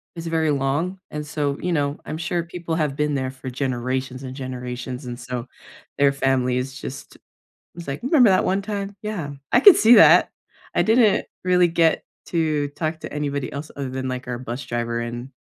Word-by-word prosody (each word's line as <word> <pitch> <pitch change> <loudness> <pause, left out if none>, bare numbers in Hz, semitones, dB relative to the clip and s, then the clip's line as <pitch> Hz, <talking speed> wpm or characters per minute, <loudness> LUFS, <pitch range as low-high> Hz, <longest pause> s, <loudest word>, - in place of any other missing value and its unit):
is 165 0 -6
very 160 -2 +1
long. 145 +7 -1
And 150 0 -5
so, 145 -2 -2
you 180 - -2
know, 145 -1 -1
I'm 155 - -4
sure 170 0 -1
people 170 -1 -5
have 150 -4 0
been 150 0 0
there 130 -1 -2
for 130 0 -8
generations 130 0 -2
and 130 0 -7
generations, 125 0 -6
and 120 0 -6
so 125 0 -5 0.5
their 140 -1 +4
family 135 -2 +1
is 130 +2 -4
just 135 - -8
it - - -21 0.5
was 170 -3 -9
like, 135 +1 -4
"Remember 260 - +5
that 185 - +3
one 195 +1 +1
time?" 200 -1 -4
Yeah. 195 -10 -4 0.2
I - - +6
could 350 +7 +9
see 230 +2 +7
that. - - +7 0.5
I - - +4
didn't 220 -2 +4 0.2
really 180 -1 +4
get 165 -1 +2 0.2
to 155 -4 0
talk 160 +2 -3
to - - -8
anybody 140 -2 -3
else 145 +3 -6
other 140 -2 -4
than, 130 0 -4
like, 130 -1 -4
our 125 -1 -3
bus 125 +1 -6
driver 120 0 -2
and 120 +3 -5
145 Hz, 200 wpm, -23 LUFS, 130-170 Hz, 0.5 s, could